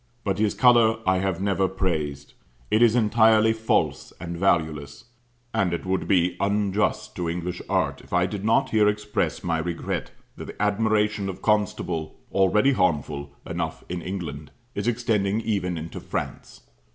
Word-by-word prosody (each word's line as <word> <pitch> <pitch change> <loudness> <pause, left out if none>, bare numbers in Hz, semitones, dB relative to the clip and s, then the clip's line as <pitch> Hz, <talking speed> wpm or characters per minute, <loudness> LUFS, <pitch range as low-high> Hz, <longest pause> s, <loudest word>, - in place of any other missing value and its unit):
But 100 -1 -1
his 105 -1 +1
colour 120 -3 +5
I 95 0 +3
have 95 -2 -1
never 95 -1 +1
praised; 75 -7 -3 0.4
it 110 - +3
is 120 -1 +5
entirely 110 -1 +4
false 110 0 0
and 85 0 -5
valueless. 80 -4 0 0.5
And 90 -3 +1
it 85 - -7
would 95 0 -1
tie 90 -2 +3
unjust 100 0 0
to 85 -2 -2
English 90 +1 -4
art - - 0
if - - -19
I 90 0 +3
did 100 +1 -5
not 110 +1 +2
here 105 -2 +4
express 105 0 -1
my 80 -2 0
regret 85 +1 -3 0.3
that - - -7
the - - -10
admiration 105 -1 +1
of 95 0 -8
Constable, 90 -6 0 0.2
already 105 +7 +3
harmful 75 - 0 0.2
enough - - -4
in 90 0 -3
England, 80 -6 -5 0.2
is 105 +2 -3
extending 110 -4 +1
even 95 -6 -1
into 80 +1 -6
France. - - -6
95 Hz, 155 wpm, -25 LUFS, 85-105 Hz, 0.5 s, colour